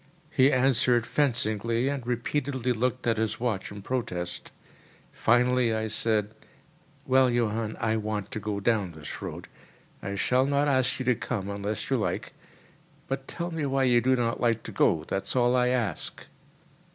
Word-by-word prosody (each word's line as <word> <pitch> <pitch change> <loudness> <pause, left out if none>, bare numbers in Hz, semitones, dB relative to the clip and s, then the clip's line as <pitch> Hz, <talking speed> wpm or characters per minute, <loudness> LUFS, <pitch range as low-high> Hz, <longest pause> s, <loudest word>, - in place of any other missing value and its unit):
He 135 +1 +4
answered 125 -2 +3
fencingly, 115 -3 0
and 140 -4 -3
repeatedly 130 +1 -1
looked 125 +2 -1
at 115 -1 +2
his 110 -1 -1
watch 110 -6 -2
in 100 -1 -9
protest. 90 -8 -3 0.6
Finally 120 0 +3
I 110 0 -2
said: 105 -1 0 0.7
"Well, 130 0 +4
Johann, 115 -2 -1
I 110 0 +1
want 105 -1 -3
to 115 - -3
go 105 -1 -3
down 100 -4 0
this 75 -1 -8
road. - - -6 0.5
I 100 - -4
shall 125 +6 +2
not 140 +1 +2
ask 130 -3 +2
you 130 - -4
to 125 - +4
come 100 -4 -4
unless 100 +1 -4
you - - +3
like; - - -2 0.7
but 135 0 -4
tell 175 0 -4
me 165 -2 -3
why 135 0 +1
you 120 -2 +4
do 130 +2 +3
not 120 -2 -1
like 115 -2 +1
to - - -7
go, 80 - +2
that 95 +4 -3
is - - -2
all 125 0 +3
I 125 -1 +3
ask." 125 -4 -2
120 Hz, 170 wpm, -27 LUFS, 110-130 Hz, 0.7 s, He